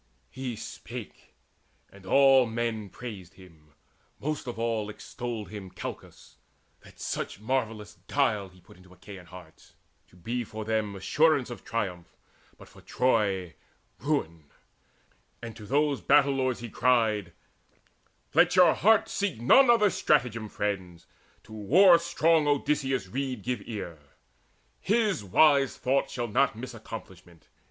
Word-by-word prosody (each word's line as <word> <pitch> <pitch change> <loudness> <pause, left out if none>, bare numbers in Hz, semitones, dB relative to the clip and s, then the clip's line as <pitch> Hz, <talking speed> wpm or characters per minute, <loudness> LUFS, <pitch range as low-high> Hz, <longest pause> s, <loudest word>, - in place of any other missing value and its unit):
He 130 -3 -5
spake, 115 0 -10 0.6
and 100 -1 -16
all 135 +1 +5
men 110 -2 -3
praised 100 -7 -9
him: 80 -6 -18 0.5
most 150 -2 -4
of 120 - -5
all 115 -2 -2
Extolled 115 0 -6
him 100 -3 -8
Calchas, - - -10 0.4
that - - -18
such - - -4
marvellous 110 -3 -3
guile 110 -9 0
He 90 0 -21
put - - -18
into 90 0 -19
the 90 - -17
Achaeans' 90 -1 -12
hearts, 90 -3 -15 0.3
to - - -23
be 120 +8 -4
For 110 -1 -8
them 110 -2 -1
assurance 140 +6 +2
of 120 - -9
triumph, 90 -7 -4 0.4
but - - -15
for - - -17
Troy 100 -9 0 0.5
Ruin; 85 - -2 0.9
and 115 -2 -8
to 105 -2 -11
those 145 0 +1
battle 140 -1 +4
lords 130 -3 -1
he 120 - -6
cried: 110 -7 +1 1.0
"Let - - +4
your 180 -2 +6
hearts 220 +1 +3
seek 200 - -2
none 245 - +6
other 210 -4 +5
stratagem, 120 -10 0
Friends; 95 -5 -4 0.4
to 110 - -14
war 170 - +5
strong 165 -2 +2
Odysseus' 140 -3 0
rede 130 +1 -4
give 125 -3 -2
ear. 95 -8 -6 0.8
His 210 - +1
wise 140 +7 +3
thought 135 +1 0
shall 120 -2 -3
not 130 +3 +1
miss 125 +2 -8
accomplishment. 95 -7 -11
115 Hz, 135 wpm, -27 LUFS, 100-135 Hz, 1.0 s, your